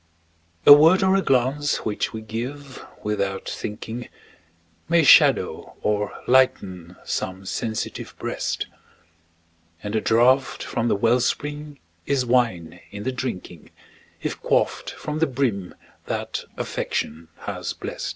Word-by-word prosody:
A 145 Hz, -, +12 dB
word 165 Hz, +6 st, +6 dB
or 190 Hz, 0 st, +4 dB
a 195 Hz, -, +3 dB
glance 135 Hz, +1 st, +1 dB
which 105 Hz, -, -1 dB
we 110 Hz, -, -6 dB
give 130 Hz, +5 st, -6 dB, 0.2 s
"without 100 Hz, -2 st, -2 dB
thinking", 110 Hz, +3 st, -6 dB, 0.8 s
May 170 Hz, 0 st, +4 dB
shadow 145 Hz, -, +5 dB
or 105 Hz, 0 st, -1 dB
lighten 95 Hz, -9 st, +2 dB
some 95 Hz, +1 st, -4 dB
sensitive 110 Hz, +3 st, -4 dB
breast; -, -, -3 dB, 1.2 s
And 105 Hz, 0 st, -4 dB
the 110 Hz, -, +1 dB
draught 125 Hz, +5 st, +3 dB
from 120 Hz, 0 st, -2 dB
the -, -, +2 dB
well 115 Hz, +4 st, +3 dB
spring 145 Hz, +3 st, -3 dB, 0.3 s
is 135 Hz, -3 st, +1 dB
wine 100 Hz, -9 st, +1 dB
in 105 Hz, 0 st, -7 dB
the 130 Hz, -, -1 dB
drinking, 105 Hz, -, -6 dB, 0.5 s
If -, -, -3 dB
quaffed -, -, +1 dB
from 150 Hz, +1 st, -5 dB
the 165 Hz, -, +3 dB
brim 120 Hz, -9 st, -2 dB, 0.3 s
that -, -, -3 dB
Affection 80 Hz, +2 st, -3 dB
has -, -, -4 dB
blest. -, -, -5 dB
120 Hz, 125 wpm, -23 LUFS, 105-140 Hz, 1.2 s, A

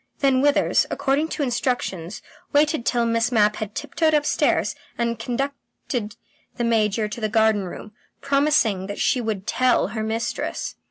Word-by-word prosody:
Then 270 Hz, -2 st, +3 dB
Withers, 290 Hz, 0 st, +3 dB
according 280 Hz, +3 st, 0 dB
to 310 Hz, -, -3 dB
instructions, 240 Hz, -8 st, -2 dB, 0.3 s
waited 295 Hz, -3 st, +2 dB
till 240 Hz, -1 st, +2 dB
Miss 230 Hz, +1 st, +1 dB
Mapp 210 Hz, -2 st, +3 dB
had 215 Hz, -1 st, -5 dB
tiptoed 315 Hz, +2 st, +1 dB
upstairs, 295 Hz, -1 st, +1 dB, 0.2 s
and 235 Hz, -1 st, -1 dB
conducted 245 Hz, -3 st, -4 dB, 0.4 s
the 240 Hz, -, -1 dB
Major 220 Hz, -2 st, +1 dB
to 210 Hz, +3 st, -7 dB
the 215 Hz, -, 0 dB
garden 220 Hz, -2 st, +2 dB
room, 195 Hz, +4 st, -8 dB, 0.3 s
promising 275 Hz, -9 st, +2 dB
that 205 Hz, -, -5 dB
she 250 Hz, -, +2 dB
would 215 Hz, -4 st, -3 dB
"tell" 250 Hz, -1 st, +2 dB
her 220 Hz, +1 st, -4 dB
mistress. 220 Hz, +1 st, -3 dB
235 Hz, 150 wpm, -23 LUFS, 215-275 Hz, 0.4 s, Then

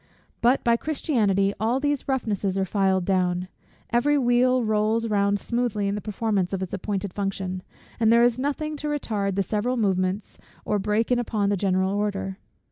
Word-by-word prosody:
But 245 Hz, +3 st, +3 dB
by 235 Hz, -1 st, +3 dB
Christianity 210 Hz, -, +1 dB
all 230 Hz, +5 st, +1 dB
these 290 Hz, -1 st, -1 dB
roughnesses 210 Hz, -7 st, -1 dB
are 190 Hz, -, +1 dB
filed 190 Hz, -2 st, +1 dB
down: 180 Hz, -1 st, 0 dB, 0.4 s
every 285 Hz, +5 st, +3 dB
wheel 250 Hz, 0 st, +3 dB
rolls 220 Hz, +1 st, +1 dB
round 200 Hz, -1 st, +2 dB
smoothly 235 Hz, -4 st, -1 dB
in 200 Hz, -, 0 dB
the 210 Hz, -, -3 dB
performance 205 Hz, -3 st, -1 dB
of 190 Hz, -1 st, -1 dB
its 185 Hz, -, -7 dB
appointed 195 Hz, -1 st, -3 dB
function, 190 Hz, -2 st, -3 dB, 0.4 s
and 225 Hz, -1 st, +4 dB
there 235 Hz, +1 st, +6 dB
is 240 Hz, 0 st, +3 dB
nothing 300 Hz, +3 st, -2 dB
to 300 Hz, -, -4 dB
retard 210 Hz, -10 st, -1 dB
the 195 Hz, -, +1 dB
several 220 Hz, +6 st, -1 dB
movements, 190 Hz, -2 st, -1 dB, 0.3 s
or 210 Hz, -, 0 dB
break 210 Hz, +4 st, 0 dB
in 245 Hz, -, +3 dB
upon 215 Hz, -4 st, 0 dB
the 205 Hz, -, +2 dB
general 190 Hz, 0 st, +1 dB
order. 200 Hz, -1 st, -2 dB
210 Hz, 175 wpm, -25 LUFS, 195-240 Hz, 0.4 s, there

